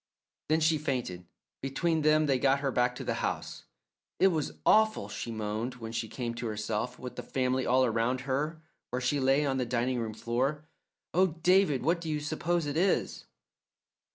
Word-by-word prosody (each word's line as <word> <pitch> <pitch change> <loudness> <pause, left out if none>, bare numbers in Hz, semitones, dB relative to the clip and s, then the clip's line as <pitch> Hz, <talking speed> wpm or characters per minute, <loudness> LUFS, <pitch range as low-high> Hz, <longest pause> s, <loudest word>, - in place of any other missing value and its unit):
Then 160 +1 +3
she 160 0 +3
fainted. 120 -12 -3 0.3
Between 160 +4 0
them 155 0 +4
they 135 -3 +2
got 140 +1 +3
her 140 -2 0
back 125 0 +1
to - - -6
the - - -1
house. - - -3 0.5
"It 190 - +6
was 160 -5 -1
awful," 220 0 +4
she 115 - -5
moaned 110 +3 -3
when 115 -2 -7
she 115 0 -2
came 120 +1 -4
to 120 0 -4
herself, 110 +3 -3
with 125 - -8
the - - -3
family 130 +1 -1
all 130 +1 +4
around 120 +2 0
her 150 +4 -2 0.3
where 125 - -2
she 130 +3 0
lay 135 +2 +3
on 135 -2 0
the 130 - +1
dining 125 +1 0
room 110 -2 -4
floor. 135 +7 -1 0.5
"Oh, 185 +2 +5 0.2
David, 180 -8 +4
what 170 +4 +1
do 165 - -5
you 150 -1 0
suppose 160 +2 -1
it 145 +1 -2
is?" 190 +4 +1
130 Hz, 185 wpm, -30 LUFS, 120-155 Hz, 0.5 s, It